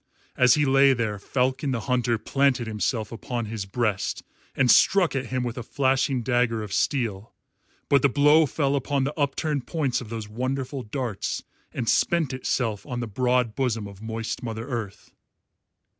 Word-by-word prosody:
As 125 -1 +5
he 150 -1 +2
lay 135 0 +5
there 110 -4 -2
Falcon 130 +5 -1
the 125 -3 -1
Hunter 125 -1 +1
planted 130 +2 +1
himself 110 0 -2
upon 120 0 -4
his 105 -2 -5
breast 105 -1 -1 0.3
and 130 -2 +4
struck 190 -6 +4
at 135 -1 -2
him 130 -1 -2
with 120 0 -4
a - - -4
flashing 130 0 0
dagger 120 -3 +1
of 105 -2 -7
steel. 115 -5 -1 0.5
But 140 -2 +4
the 140 - +4
blow 150 +3 +5
fell 140 -1 0
upon 140 0 0
the 140 +3 -2
upturned 145 -1 -1
points 145 -8 -1
of 115 - -9
those 110 -2 -5
wonderful 130 +4 -3
darts 120 -2 -3 0.3
and 115 - -4
spent 160 -1 +2
itself 115 -5 -1
on 125 -1 -5
the 120 - -2
broad 125 +1 +1
bosom 115 -4 -1
of 100 0 -12
moist 115 +2 -4
Mother 115 -1 -5
Earth. 115 -7 -6
125 Hz, 170 wpm, -25 LUFS, 115-135 Hz, 0.5 s, As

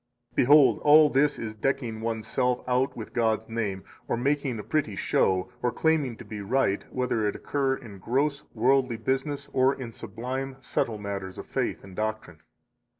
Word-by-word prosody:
55 - - -33
Behold, 145 +2 +6
all 150 +1 +7
this 145 +2 +3
is 110 -2 -5
decking 115 -1 -2
one's 110 -1 -2
self 125 +2 0
out 125 +1 +1
with 110 - -7
God's 110 -2 +1
name, 105 -4 -3 0.2
or - - 0
making 135 -1 0
a 105 - -6
pretty 145 -8 -1
show, 95 -1 +1
or 125 - +1
claiming 150 -7 +1
to - - -11
be 105 -2 -6
right, 100 -1 +1
whether 125 -4 0
it 105 - -2
occur 135 -2 0
in 105 -7 -11
gross, 140 +7 0
worldly 130 +1 +2
business 135 +5 -2
or 130 +1 +3
in 125 -4 -7
sublime, 125 +5 -5
subtile 120 -3 -1
matters 100 -2 -5
of - - -7
faith - - -2
and 95 -1 -12
doctrine. 110 -6 -3
120 Hz, 175 wpm, -27 LUFS, 110-135 Hz, 0.2 s, all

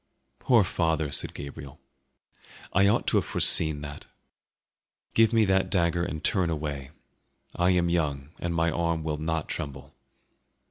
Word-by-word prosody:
"Poor 120 -5 +4
father!" 80 -5 -1
said - - -2
Gabriel. 70 0 -9 0.9
"I 100 +2 +4
ought 100 - +2
to - - +2
have - - +1
foreseen 80 -2 +2
that. 75 -1 -9 1.1
Give 115 0 +4
me 115 -2 +4
that 95 -1 +2
dagger 85 -2 +1
and 80 -4 -5
turn 90 -3 +2
away; 75 -4 -4 0.7
I 90 +1 +2
am 90 -1 +2
young 75 -5 -1
and 85 -1 -2
my 85 0 +2
arm 85 -1 -1
will 75 -1 -3
not 80 0 -2
tremble." 70 -3 -6
80 Hz, 145 wpm, -27 LUFS, 75-90 Hz, 1.1 s, Poor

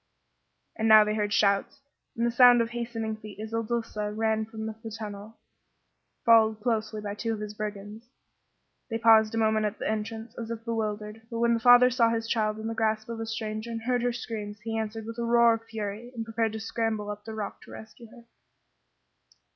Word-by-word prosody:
And 220 - 0
now 215 -1 +9
they 210 0 -1
heard 210 -1 -1
shouts 200 +5 +2 0.4
and 230 - +1
the 235 - +1
sound 245 0 +7
of 230 0 0
hastening 230 -2 -4
feet 215 -1 -11
as 220 +1 -7
Il 230 - +1
Duca 225 -2 -3
ran 220 0 0
from 220 0 -7
the 220 - -4 0.2
tunnel, 210 0 -8 0.9
followed 220 -2 +5
closely 220 -2 -1
by 205 -1 -4
two 225 +2 -3
of - - -8
his 210 0 -6
brigands. 210 +1 -6 0.8
They 225 - -1
paused 225 -1 +5
a - - -1
moment 220 -1 +2
at 205 - -6
the - - -4
entrance, 220 +1 -4
as 230 -1 -5
if 230 -1 -6
bewildered, 215 -1 -3
but 230 - -5
when 235 0 +3
the 230 - +1
father 245 +1 +7
saw 230 -2 +3
his 225 0 -2
child 215 -2 0
in 220 - -7
the 225 - -2
grasp 220 0 -1
of 230 -1 -5
a 225 - -4
stranger 220 0 -4
and 225 -1 -5
heard 245 0 +1
her 245 0 +1
screams 215 -3 -6
he 225 +1 -4
answered 220 0 -3
with 230 +1 -7
a - - -1
roar 235 0 +5
of 225 0 -5
fury 220 +2 -6
and 225 -1 -4
prepared 225 -1 -1
to 220 - -4
scramble 220 -1 -2
up 210 0 -8
the 220 0 -7
rock 205 -2 -5
to - - -14
rescue 220 +2 -11
her. 235 0 -15
220 Hz, 210 wpm, -27 LUFS, 215-230 Hz, 0.9 s, now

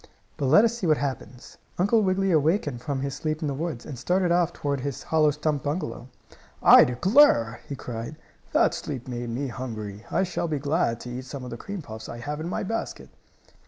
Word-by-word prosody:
But 140 - -1
let 185 - +7
us 235 0 0
see 200 -7 -2
what 155 -2 +4
happens. 130 -3 -6 0.2
Uncle 205 +5 +3
Wiggily 195 -1 +1
awakened 155 - +1
from 140 -2 -3
his 140 0 -3
sleep 155 +1 -3
in - - 0
the 140 - -1
woods, 150 -3 -4
and 135 -5 -7
started 180 +6 +1
off 175 -1 +3
toward 140 -4 -2
his 140 0 -4
hollow 155 -1 +3
stump 150 -1 -1
bungalow. 145 -5 -4 0.6
"I - - +9
declare!" 125 - +4
he 140 - -3
cried. 120 +2 -6 0.4
"That - - +3
sleep 130 -4 -5
made 120 -1 -4
me 130 +4 -3
hungry. 110 -5 -6
I - - +1
shall 180 -2 -2
be 155 -2 -1
glad 140 -4 0
to 125 - -7
eat 130 +1 -6
some 130 0 -7
of 125 - -7
the - - -4
cream 195 +5 -6
puffs 110 -3 -9
I 120 - -6
have 145 +5 -5
in 160 +2 -4
my - - -2
basket." 225 +4 -4
145 Hz, 210 wpm, -26 LUFS, 125-170 Hz, 0.6 s, I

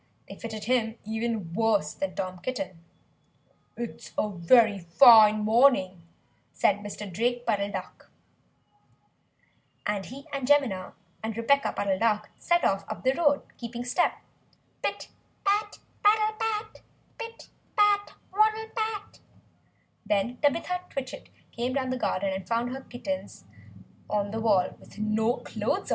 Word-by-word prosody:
_ - - -41
They - - -9
fitted 220 -3 -6
him 230 -2 +1
even 220 -5 -3
worse 210 -6 +1
than 190 -2 -4
Tom 185 -1 -4
Kitten. 190 - -5 0.9
"It's 235 -1 -7
a 210 - +1
very 205 +4 +4
fine 215 +4 +7
morning!" 215 -5 +3 0.5
said 200 - +2
Mr. 205 0 -7
Drake 240 +6 -1
Puddle 205 -3 0
Duck. 190 -2 -7 1.8
And 205 -2 -1
he 275 +2 -10
and 275 -2 -2
Jemima 260 -11 +2 0.3
and 220 -1 -4
Rebeccah 275 +5 +2
Puddle 195 -2 0
Duck 215 -1 +1
set 345 0 +2
off 195 0 +2
up - - -6
the 260 0 +3
road, 290 -2 +2 0.2
keeping 240 0 -5
step 300 +8 +2 0.7
pit - - -3 0.3
pat, 415 +1 +1 0.3
paddle 430 +1 +4
pat! 435 -1 -2 0.4
pit 460 0 -8 0.3
pat, 410 -1 +3 0.2
waddle 435 +2 +2
pat! 435 -2 -3 0.8
Then 210 +4 0
Tabitha 335 +6 0
Twitchit 265 -2 -6 0.2
came 245 +2 -2
down 260 -1 -1
the 255 - -1
garden 195 +1 0
and 190 -1 -5
found 235 +1 0
her 265 +1 -5
kittens 280 +3 -6 0.7
on 205 -1 0
the 225 +1 -3
wall 200 -5 +2
with - - -16
no 220 +3 +1
clothes - - -2
on. - - -5
230 Hz, 140 wpm, -27 LUFS, 205-280 Hz, 1.8 s, fine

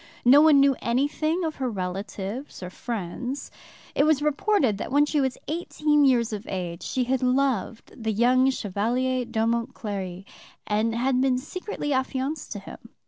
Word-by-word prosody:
No 275 +4 +8
one 305 -2 +6
knew 275 -1 +5
anything 300 +8 0
of 315 -2 -3
her 260 -2 -1
relatives 195 +4 -5
or 180 - -6
friends. 240 +5 -5 0.4
It - - +3
was 305 -1 +3
reported 295 - +1
that - - -5
when 290 +2 +4
she 295 -1 0
was 265 -2 -1
eighteen 300 -2 +1
years 235 -4 +3
of 210 -1 -6
age 175 -3 -4
she 255 - -1
had 255 +1 0
loved 255 -4 0
the 220 -2 -2
young 250 +4 +4
Chevalier 245 +3 -1
d'Aumont 230 +1 -1
Cléry, 195 -3 -5 0.4
and 220 +2 0
had 255 +2 +1
been 260 -1 +2
secretly 295 +1 -4
affianced 265 +3 -2
to - - -6
him. - - -10
255 Hz, 160 wpm, -25 LUFS, 220-280 Hz, 0.4 s, No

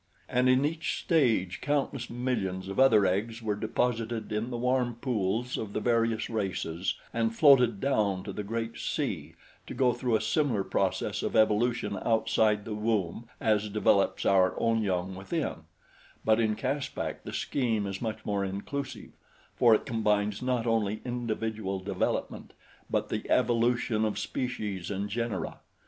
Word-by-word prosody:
And 125 +1 +2
in 130 +2 +4
each 160 +2 -2
stage 115 - +2
countless 140 -4 -1
millions 110 -7 -2
of 95 - -4
other 115 -7 +6
eggs 110 +5 -1
were 105 -1 0
deposited 115 +2 -1
in 110 +3 -1
the 120 - -3
warm 125 0 +1
pools 120 -1 -1
of 105 -2 -5
the - - 0
various 115 -1 +1
races 95 -5 -2 0.2
and 115 -1 0
floated 125 -8 +6
down 105 -8 +1
to - - -6
the - - -4
great 115 +2 -4
sea - - -3 0.3
to - - -6
go 125 -2 +3
through 120 -1 0
a - - +3
similar 130 -10 +1
process - - -1
of - - -2
evolution 110 +2 +2
outside 110 -2 +2
the 110 - -4
womb 105 0 -1
as 105 -1 +1
develops 100 -1 +2
our 95 -1 +3
own 115 -1 +2
young 95 -2 -1
within; 95 - -3 0.6
but 110 +1 +4
in 110 -2 +2
Caspak 135 +4 -3
the - - -6
scheme 115 -7 -1
is 95 -1 -4
much 110 -2 -4
more 100 -1 0
inclusive, 100 +9 -5 0.4
for 115 -3 +6
it - - -2
combines 105 -4 0
not 125 -2 0
only 110 -2 +1
individual 110 -4 -2
development 95 +2 -3 0.4
but - - 0
the - - -4
evolution 120 -2 +2
of 110 -1 0
species 105 -8 -3
and 100 0 -3
genera. 115 -2 -3
110 Hz, 155 wpm, -29 LUFS, 100-120 Hz, 0.6 s, other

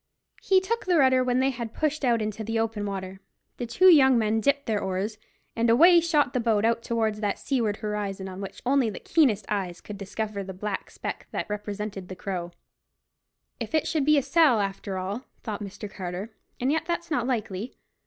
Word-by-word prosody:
He 380 -1 +4
took 460 +4 -3
the 355 -2 +4
rudder 260 -3 +5
when 250 0 +1
they 270 +1 +2
had 235 -3 -6
pushed 305 -1 -1
out 235 -3 +2
into 215 +1 -4
the 225 +1 -2
open 225 -2 -1
water, 190 -1 -5 0.4
the 240 - -4
two 285 +11 +2
young 265 -7 +7
men 220 0 +1
dipped 280 +3 +1
their 215 -2 0
oars, 195 +3 -3 0.4
and 230 0 +2
away 340 +9 +7
the 305 -6 +2
boat 225 -3 +2
shot - - +3
out 230 0 +2
towards 220 -2 -1
that 205 -2 -1
seaward 230 -7 -1
horizon 205 -3 -3
on 190 +1 -7
which 195 - -8
only 260 -2 +3
the 205 - -7
keenest 260 -11 +2
eyes 185 -4 -2
could 205 -1 -9
discover 205 +1 -4
the 190 -1 -8
black 205 +1 -4
speck - - -6
that - - -3
represented 205 -2 -5
the 185 - -7
Crow. 185 -2 -4 1.1
"If - - -3
it 315 - +1
should 310 -3 0
be 305 0 +6
a 280 - +2
sell, 280 -4 +4
after 195 -1 -3
all," 200 +7 -4 0.2
thought 215 -2 -4
Mr. 205 +1 -7
Carter; 190 +2 -6 0.3
"and 255 +3 +1
yet 320 +1 -1
that's 340 -1 -3
not 245 -4 0
likely. 220 -2 -3
225 Hz, 205 wpm, -26 LUFS, 200-265 Hz, 1.1 s, young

